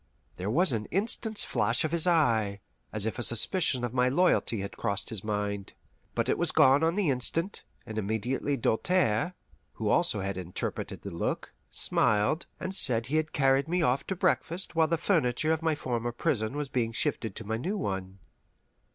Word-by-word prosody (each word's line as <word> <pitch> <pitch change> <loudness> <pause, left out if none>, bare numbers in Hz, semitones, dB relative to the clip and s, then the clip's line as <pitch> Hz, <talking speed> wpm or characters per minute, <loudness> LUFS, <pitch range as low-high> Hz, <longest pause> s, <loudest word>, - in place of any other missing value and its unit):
There 95 +3 -3
was 160 - +3
an 110 -3 -2
instant's 215 +2 +1
flash 115 +3 +1
of 155 - -1
his 170 +1 +4
eye, 115 - +2 0.3
as 110 -1 -2
if 110 +2 -3
a - - -2
suspicion 125 - +2
of 120 -1 -3
my 125 0 +2
loyalty 135 - +2
had 100 - -6
crossed 100 -4 -2
his 110 -5 -5
mind; 105 -2 -3 0.4
but - - 0
it - - 0
was 175 -2 +1
gone 145 0 +5
on 165 +2 +2
the 195 -8 +1
instant, 165 +9 -1 0.2
and 110 -1 -4
immediately 110 +7 -2
Doltaire, 170 +4 +1 0.4
who - - -3
also 105 - +2
had 95 -1 -3
interpreted 90 -1 -4
the 100 - -6
look, 85 - -3 0.2
smiled, 105 - +1
and 185 - -4
said 115 - +6
he 145 +5 -1
had 155 0 -1
carried 135 0 +2
me 175 +1 0
off 130 -1 +1
to 190 - -2
breakfast 180 -1 -1
while 160 -1 +4
the 165 +1 0
furniture 155 -3 +1
of 160 - -2
my 160 -1 +1
former 120 -4 -3
prison 120 -1 -1
was 150 -1 -2
being 120 -3 -1
shifted 110 -2 -2
to 115 - -7
my 110 +2 -2
new 185 - -3
one. 95 - -4
125 Hz, 185 wpm, -28 LUFS, 110-165 Hz, 0.4 s, said